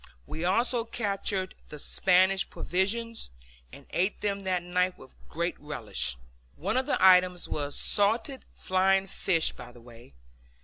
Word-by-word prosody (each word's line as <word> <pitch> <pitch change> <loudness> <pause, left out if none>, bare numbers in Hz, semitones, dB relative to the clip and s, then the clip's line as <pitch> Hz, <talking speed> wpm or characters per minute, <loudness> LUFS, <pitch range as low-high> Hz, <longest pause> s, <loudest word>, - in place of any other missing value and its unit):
We 160 - -6
also 230 +6 +1
captured 200 -4 -2 0.2
the 150 - -8
Spanish 190 +5 +2
provisions, 225 +5 -2 0.4
and - - -13
ate 190 +4 0
them 200 -1 -1
that 185 -2 -1
night 180 +1 0
with - - -15 0.2
great - - -2
relish. 65 0 -3 0.4
One 195 +8 -2
of 260 0 0
the - - +1
items 180 -1 +5
was 145 -1 -3
salted 225 +6 +1
flying 190 +1 +2
fish, 170 -4 +1
by - - -11
the 120 - -16
way. 115 - -16
185 Hz, 140 wpm, -28 LUFS, 175-200 Hz, 0.4 s, items